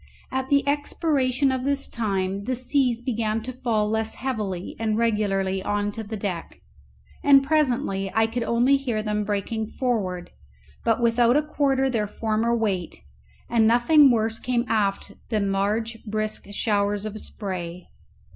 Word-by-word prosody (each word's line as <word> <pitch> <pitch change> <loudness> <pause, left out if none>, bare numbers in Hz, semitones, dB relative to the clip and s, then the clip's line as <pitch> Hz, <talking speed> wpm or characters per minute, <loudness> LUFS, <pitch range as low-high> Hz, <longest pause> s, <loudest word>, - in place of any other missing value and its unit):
At 265 0 -2
the 280 -1 +3
expiration 280 -2 +1
of 260 -1 -2
this 280 0 0
time 195 -4 -1
the 255 - -1
seas 250 -2 0
began 225 -3 -1
to 255 +2 -6
fall 230 -4 0
less 220 +1 -1
heavily 210 -9 -3
and 220 -1 0
regularly 195 -4 0
on 205 +1 -1
to 225 - -6
the 220 +1 -6
deck, 185 -4 -5 0.6
and 275 -1 +7
presently 255 -10 0
I 225 0 +4
could 230 +2 -3
only 240 +4 +3
hear 240 -6 -2
them 210 -1 -1
breaking 210 +2 -2
forward, 195 -9 -2 0.5
but 230 +1 +1
without 235 +2 +4
a 300 - +2
quarter 275 -3 +1
their 225 -5 0
former 220 +2 0
weight, 190 - -2 0.4
and 230 -2 +3
nothing 270 +5 +6
worse 225 -2 +1
came 245 -1 0
aft 200 -3 0 0.2
than 210 -3 0
large 220 +4 -1
brisk 215 -1 -3
showers 205 0 0
of 215 0 -5
spray. 180 -5 -6
225 Hz, 150 wpm, -24 LUFS, 205-255 Hz, 0.6 s, and